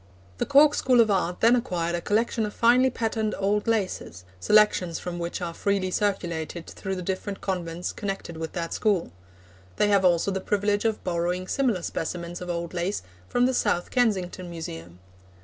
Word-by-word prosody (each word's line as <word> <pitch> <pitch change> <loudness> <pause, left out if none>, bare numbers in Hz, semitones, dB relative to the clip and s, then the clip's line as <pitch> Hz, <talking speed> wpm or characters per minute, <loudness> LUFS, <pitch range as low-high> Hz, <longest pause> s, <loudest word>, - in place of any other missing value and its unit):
The - - -1
Cork 290 +1 +6
School 255 -4 +3
of 220 -2 +5
Art 180 -2 0
then 230 +2 +6
acquired 175 -8 -1
a 175 - -1
collection 225 +3 +1
of 210 - -9
finely 250 +3 +5
patterned 225 -3 -1
old 205 +2 0
laces, 190 - -2 0.2
selections 180 - +3
from 175 -1 -5
which 170 +1 -4
are 170 -1 -3
freely 195 0 0
circulated 175 -5 -2
through 190 -1 -5
the 180 - -5
different 195 +2 -3
convents 175 -2 -3
connected 195 -4 -5
with 160 0 -5
that 170 -1 -3
school. 200 - +1 0.6
They 210 - +2
have 200 -2 +4
also 180 +1 +3
the 190 0 -2
privilege 205 +2 0
of 220 -1 0
borrowing 180 +1 -1
similar 235 -10 0
specimens 170 +1 -4
of 180 - -6
old 170 0 -3
lace 180 - -2 0.3
from 245 0 +3
the 260 - +2
South 175 -7 0
Kensington 190 -7 0
Museum. 85 - -7
190 Hz, 175 wpm, -26 LUFS, 170-215 Hz, 0.6 s, Cork